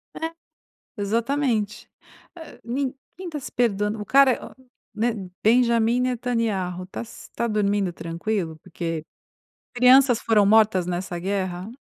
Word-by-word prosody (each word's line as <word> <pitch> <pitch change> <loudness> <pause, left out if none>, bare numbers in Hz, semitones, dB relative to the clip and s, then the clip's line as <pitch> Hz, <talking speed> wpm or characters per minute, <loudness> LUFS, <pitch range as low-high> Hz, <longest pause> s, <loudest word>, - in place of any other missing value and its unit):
É, 325 0 -3 0.7
exatamente. 225 0 -1 0.5
Eh 320 -2 -11
ninguém 270 +8 -5
tá 305 -3 -5
se 265 - -9
perdoando, 210 -2 0
o - - -5
cara 275 +3 +6
é - - -5 0.6
né? 215 -4 -2
Benjamin 235 0 +3
Netanyahu, 230 -8 -1
tá - - -6
s 235 - -11
tá 235 - 0
dormindo 205 -3 0
tranquilo? 165 +1 -3
Porque 165 -1 -4 0.7
crianças 250 0 +6
foram 215 -2 +3
mortas 210 -4 +4
nessa 180 0 -3
guerra? 185 +1 -3
220 Hz, 120 wpm, -24 LUFS, 190-245 Hz, 0.7 s, cara